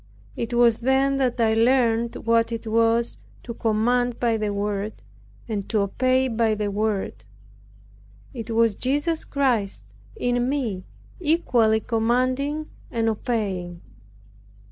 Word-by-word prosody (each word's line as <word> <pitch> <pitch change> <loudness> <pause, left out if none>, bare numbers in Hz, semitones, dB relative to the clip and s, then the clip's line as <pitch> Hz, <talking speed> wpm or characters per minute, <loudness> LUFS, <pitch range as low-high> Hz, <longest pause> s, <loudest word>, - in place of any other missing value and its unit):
It 230 - -4
was 235 -2 +4
then 270 +2 +2
that 255 -2 0
I 225 -1 +3
learned 235 0 +2
what 230 0 +2
it 230 0 -4
was 230 +1 +1 0.2
to 235 - -6
command 235 +2 0
by 235 -2 +2
the 215 -1 -1
Word, 205 - -3 0.4
and 205 -3 -4
to 215 -3 +1
obey 255 +6 +1
by 225 -2 +1
the 210 -1 -2
Word. 200 - -2 1.1
It 225 -1 -7
was 225 -2 +2
Jesus 290 +5 -1
Christ 235 - 0 0.3
in 245 0 0
me 230 -10 -2 0.3
equally 245 -10 +2
commanding 255 +7 0 0.2
and 225 -1 0
obeying. 195 -6 -3
230 Hz, 120 wpm, -24 LUFS, 215-250 Hz, 1.1 s, was